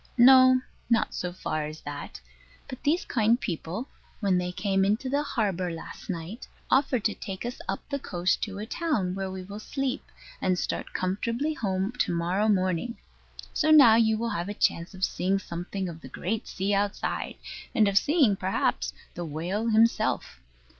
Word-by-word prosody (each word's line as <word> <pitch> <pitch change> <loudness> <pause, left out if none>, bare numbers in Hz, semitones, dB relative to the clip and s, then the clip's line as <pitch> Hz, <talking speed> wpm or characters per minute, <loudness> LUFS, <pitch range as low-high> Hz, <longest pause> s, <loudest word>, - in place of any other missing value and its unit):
No, 255 +1 +8 0.3
not 230 -2 +2
so 180 - -3
far 155 -4 -3
as 155 +1 -8
that; 145 0 -7 0.5
but 260 -2 -8
these 320 +5 +1
kind 230 +1 +2
people, 180 - -4 0.3
when 195 -4 +2
they 180 0 -2
came 195 +1 +1
into 215 +7 +1
the 285 +2 +1
harbour 195 - -1
last 165 +5 -8
night, 180 +6 -5 0.2
offered 260 -4 +3
to 215 - +2
take 195 +1 -6
us 245 +1 -4
up - - -4
the 280 -1 -2
coast 180 -6 0
to 200 -2 -3
a 210 - -4
town, 230 - -1
where 190 0 -3
we 185 0 -6
will 200 +3 -8
sleep, 270 +3 -2 0.4
and 185 -1 +2
start - - -3
comfortably 230 +11 -1
home 195 -5 -1
to - - +2
morrow 180 +5 +1
morning. 185 +3 +1 0.6
So 310 - +1
now 280 -8 +9
you 220 -1 +4
will 230 +1 -2
have 180 -1 -2
a 205 - -4
chance 170 0 0
of 185 - -7
seeing 190 +2 0
something 185 +1 -4
of 165 -2 -8
the - - -10
great 215 +6 -3
sea 195 +1 -1
outside, 200 +1 -1 0.4
and 215 -4 +5
of 200 - 0
seeing, 280 - +4
perhaps, 190 0 0 0.2
the 175 - -5
whale 175 +8 -2
himself. 220 - +2
200 Hz, 175 wpm, -27 LUFS, 185-235 Hz, 0.6 s, now